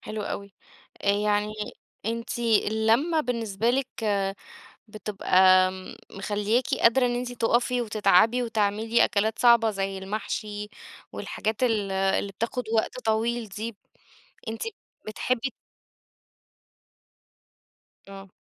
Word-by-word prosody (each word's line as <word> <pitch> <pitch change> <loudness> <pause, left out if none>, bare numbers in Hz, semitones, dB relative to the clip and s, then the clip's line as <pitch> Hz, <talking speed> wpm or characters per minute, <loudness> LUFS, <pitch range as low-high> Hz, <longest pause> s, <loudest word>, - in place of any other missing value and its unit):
حلو 215 -1 -5
أوي، 200 -1 -6 0.5
آآ، 200 - +2
يعني 210 +1 +1 0.5
أنتِ 230 +1 -3
اللمّة 225 +7 +2
بالنسبة 230 -4 -1
لِك 260 +1 +1 1.0
بتبقى 190 -3 +3 0.4
مخلياكِ 210 +5 0 0.2
قادرة 250 +2 +5
إن 245 - 0
أنتِ 245 0 -3
تُقفي 240 +1 +1
وتتعبي 215 +2 +3
وتعملي 225 0 +1
أكلات 220 0 0
صعبة 235 -2 +5
زي 195 -1 -3
المحشي 210 +1 -4 0.4
والحاجات 220 +3 -3
ال 215 -5 +1
اللي 195 +1 0
بتاخد 230 +5 -3
وقت 225 +3 0
طويل 225 +1 0
دي، 215 +3 -6 0.7
أنتِ 225 0 -4 0.4
بتحبي 250 +4 -1 2.6
آه. 195 0 -10
220 Hz, 100 wpm, -26 LUFS, 205-235 Hz, 2.6 s, قادرة